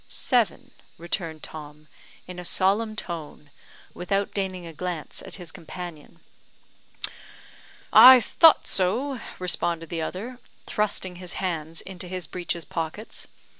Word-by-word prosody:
"Seven," 235 Hz, -, +1 dB, 0.3 s
returned 165 Hz, -2 st, -4 dB
Tom, 150 Hz, 0 st, -9 dB, 0.4 s
in 180 Hz, -1 st, -8 dB
a -, -, -6 dB
solemn 205 Hz, +5 st, +2 dB
tone, 155 Hz, -6 st, -5 dB, 0.4 s
without 195 Hz, +3 st, -1 dB
deigning 185 Hz, -3 st, -2 dB
a 165 Hz, -, -8 dB
glance 170 Hz, -2 st, -5 dB
at -, -, -5 dB
his 175 Hz, -4 st, -7 dB
companion. 170 Hz, -2 st, -9 dB, 1.7 s
"I 255 Hz, 0 st, +11 dB
thought 320 Hz, +6 st, +5 dB
so," 240 Hz, +9 st, +1 dB, 0.2 s
responded 170 Hz, -2 st, -1 dB
the 165 Hz, -1 st, -2 dB
other, 225 Hz, +10 st, -5 dB, 0.3 s
thrusting 195 Hz, -4 st, -1 dB
his 180 Hz, -1 st, -4 dB
hands 165 Hz, -3 st, -3 dB
into 185 Hz, -1 st, -7 dB
his 185 Hz, -1 st, -4 dB
breeches 170 Hz, 0 st, -4 dB
pockets. 165 Hz, +6 st, -5 dB
180 Hz, 120 wpm, -26 LUFS, 165-200 Hz, 1.7 s, I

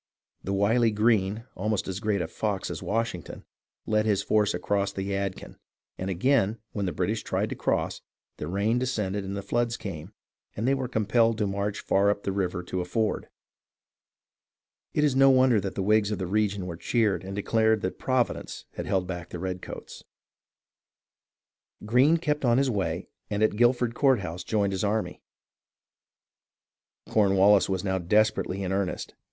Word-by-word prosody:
The 95 Hz, -, -3 dB
wily 110 Hz, +4 st, +3 dB
Greene, 105 Hz, 0 st, +1 dB
almost 105 Hz, +1 st, -2 dB
as 95 Hz, 0 st, -3 dB
great 105 Hz, -4 st, 0 dB
a -, -, -4 dB
"fox" 100 Hz, +2 st, -2 dB
as -, -, -5 dB
Washington, 115 Hz, -6 st, -3 dB, 0.4 s
led 110 Hz, 0 st, +1 dB
his 100 Hz, -2 st, +2 dB
force 105 Hz, -3 st, +2 dB
across 100 Hz, +2 st, 0 dB
the 95 Hz, -1 st, -4 dB
Yadkin, 100 Hz, -1 st, -4 dB, 0.4 s
and 95 Hz, -, -4 dB
again 110 Hz, +2 st, +2 dB
when 100 Hz, -2 st, -2 dB
the -, -, -1 dB
British -, -, -1 dB
tried -, -, -1 dB
to -, -, -2 dB
cross, -, -, -1 dB, 0.4 s
the 75 Hz, -, -5 dB
rain 100 Hz, +6 st, +1 dB
descended 105 Hz, -6 st, -1 dB
and 100 Hz, +1 st, -4 dB
the 100 Hz, -, -5 dB
floods 120 Hz, +3 st, 0 dB
came, 90 Hz, -3 st, -7 dB, 0.5 s
and 110 Hz, +4 st, -1 dB
they 135 Hz, -, +4 dB
were 135 Hz, -2 st, -1 dB
compelled 115 Hz, 0 st, +2 dB
to 105 Hz, -, +1 dB
march 100 Hz, +1 st, -2 dB
far 100 Hz, +1 st, +2 dB
up 100 Hz, 0 st, -1 dB
the 100 Hz, -, -1 dB
river 90 Hz, -2 st, -2 dB
to 90 Hz, +1 st, -3 dB
a -, -, -3 dB
ford. 110 Hz, +4 st, -1 dB, 1.7 s
It 150 Hz, -, +3 dB
is 145 Hz, -3 st, +2 dB
no 135 Hz, 0 st, +6 dB
wonder 130 Hz, -4 st, +5 dB
that 95 Hz, 0 st, -4 dB
the 95 Hz, -, -1 dB
Whigs 105 Hz, +1 st, +3 dB
of 105 Hz, -, -2 dB
the 95 Hz, -, -3 dB
region 100 Hz, 0 st, 0 dB
were 85 Hz, -2 st, -6 dB
cheered 110 Hz, -1 st, +1 dB
and 95 Hz, +1 st, -6 dB
declared 110 Hz, +1 st, +2 dB
that 95 Hz, -, -3 dB
Providence 130 Hz, -2 st, -1 dB
had -, -, -5 dB
held 95 Hz, -2 st, +1 dB
back 90 Hz, -1 st, -6 dB
the -, -, -6 dB
redcoats. 90 Hz, +1 st, -6 dB, 1.8 s
Greene 130 Hz, +9 st, +4 dB
kept 150 Hz, -3 st, -1 dB
on 120 Hz, -1 st, +4 dB
his 135 Hz, -1 st, +2 dB
way 95 Hz, -4 st, -2 dB, 0.2 s
and 105 Hz, 0 st, 0 dB
at 110 Hz, -, +2 dB
Guilford 120 Hz, +1 st, +3 dB
Courthouse 100 Hz, -, +1 dB
joined 100 Hz, -2 st, 0 dB
his 95 Hz, -, -2 dB
army. 105 Hz, +1 st, -1 dB, 1.9 s
Cornwallis 100 Hz, -1 st, +4 dB
was 95 Hz, 0 st, -1 dB
now 95 Hz, -1 st, 0 dB
desperately 100 Hz, +1 st, +1 dB
in 95 Hz, -, -2 dB
earnest. 95 Hz, -1 st, -2 dB
105 Hz, 170 wpm, -27 LUFS, 95-115 Hz, 1.9 s, no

